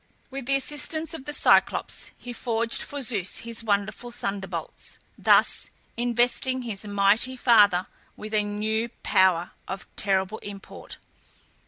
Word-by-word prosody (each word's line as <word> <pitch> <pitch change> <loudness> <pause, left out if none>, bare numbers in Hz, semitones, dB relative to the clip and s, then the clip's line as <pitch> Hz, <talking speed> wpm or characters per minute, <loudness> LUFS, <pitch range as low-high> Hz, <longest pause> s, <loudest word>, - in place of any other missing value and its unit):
With 270 -2 -6
the 275 - +3
assistance 295 +4 -1
of 270 -5 -8
the 295 - -3
Cyclops, - - +2
he 245 - -8
forged 230 -1 -1
for 285 -1 -5
Zeus 205 -6 +2
his 230 -1 -1
wonderful 210 +2 -1
thunderbolts, 195 -7 -5 0.2
thus - - +3 0.3
investing 245 +2 +1
his 210 -3 -5
mighty 205 +6 +2
father 205 -7 +5 0.3
with 215 +1 -8
a 215 - +4
new 215 +2 -1
power 180 -2 +3 0.2
of 190 +1 -5
terrible 195 +1 0
import. 200 -1 -10
220 Hz, 130 wpm, -26 LUFS, 200-245 Hz, 0.3 s, father